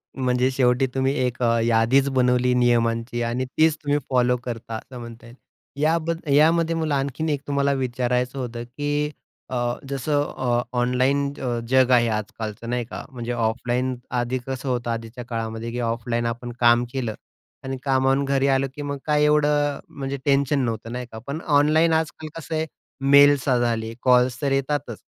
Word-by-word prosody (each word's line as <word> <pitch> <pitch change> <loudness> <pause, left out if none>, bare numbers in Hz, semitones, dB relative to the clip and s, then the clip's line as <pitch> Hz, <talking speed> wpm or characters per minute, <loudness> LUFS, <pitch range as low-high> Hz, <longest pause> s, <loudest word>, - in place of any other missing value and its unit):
म्हणजे 125 -1 +1
शेवटी 130 0 +2
तुम्ही 135 +1 +1
एक 125 0 -3
अ, 115 0 +3
यादीच 120 +4 +3
बनवली 125 -1 +2
नियमांची 120 -1 +1
आणि 120 +2 -1
तीच 160 -1 +4
तुम्ही 145 0 +1
फॉलो 125 -1 +2
करता, 115 -2 -5
असं 125 +2 -10
म्हणता 115 0 -10
येईल. 120 +1 -13 0.5
याबद 165 +1 +1
यामध्ये 165 +3 +4
मला 155 -3 0
आणखीन 140 +3 -2
एक 145 -2 -1
तुम्हाला 140 0 +1
विचारायचं 125 0 -1
होतं, 120 -1 -4
की 145 +4 -2 0.4
अ, 120 -1 -1 0.2
जसं 145 +2 0
अ, 120 -2 +1 0.2
ऑनलाईन 130 +3 +1
अ, 120 -2 -1
जग 130 -1 +4
आहे 120 -1 +5
आजकालचं 110 +1 -4
नाही 120 -1 -1
का, - - -7
म्हणजे 120 -1 -5
ऑफलाईन 120 +2 -1 0.2
आधी 120 +2 -1
कसं 130 0 -4
होतं 120 -1 -1
आधीच्या 115 +1 -6
काळामध्ये 115 -1 -4
की 120 - -4
ऑफलाईन 115 0 -2
आपण 120 +1 -4
काम 120 0 +5
केलं 120 -5 -2 0.5
आणि 130 0 -4
कामावरून 135 0 +2
घरी 135 0 +1
आलो 135 0 +2
की 145 - -6
मग 140 -1 -3
काय 150 -1 +2
एवढं 150 -1 +2
म्हणजे 140 0 -5
टेन्शन 140 0 +2
नव्हतं 115 0 -4
नाही 125 0 -4
का, 110 - -8
पण 155 +4 -4 0.2
ऑनलाईन 160 +3 +3
आजकाल 155 -1 -2
कसं 160 +2 -5
आहे, 160 0 0 0.4
मेल्स 140 0 +6
झाले, 115 -2 0
कॉल्स 125 0 +3
तर 140 -1 0
येतातच. 135 -3 -1
130 Hz, 165 wpm, -23 LUFS, 120-140 Hz, 0.5 s, मेल्स